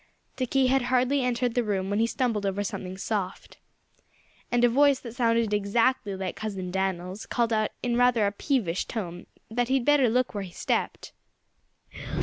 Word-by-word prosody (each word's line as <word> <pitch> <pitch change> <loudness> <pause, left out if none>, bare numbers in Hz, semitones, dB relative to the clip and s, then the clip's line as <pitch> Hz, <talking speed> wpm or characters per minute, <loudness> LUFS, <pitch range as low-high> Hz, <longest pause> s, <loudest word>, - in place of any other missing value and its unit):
Dickie 260 +1 +1
had 265 +1 +3
hardly 255 +2 +2
entered 245 -1 0
the 245 - +1
room 195 -2 -1
when 205 - +1
he 230 - +3
stumbled 235 -5 -1
over 200 +1 -1
something 185 -1 -5
soft. 195 -2 -4 0.9
And 240 0 +2
a - - +8
voice 275 +2 +4
that 235 -3 -8
sounded 230 -3 +2
exactly 210 +1 +1
like 190 -1 -4
Cousin 195 -4 -5
Dan'l's 190 +1 -3
called 235 -2 0
out 215 -1 +1
in 240 -1 0
rather 245 -3 +4
a 200 - +1
peevish 205 - -1
tone 175 -6 -6 0.2
that 240 +1 0
he'd 260 -1 +1
better 290 -4 +4
look 250 +2 +1
out - - -26
where 205 -2 -3
he 180 - -11
stepped. - - -2
230 Hz, 175 wpm, -27 LUFS, 195-250 Hz, 0.9 s, a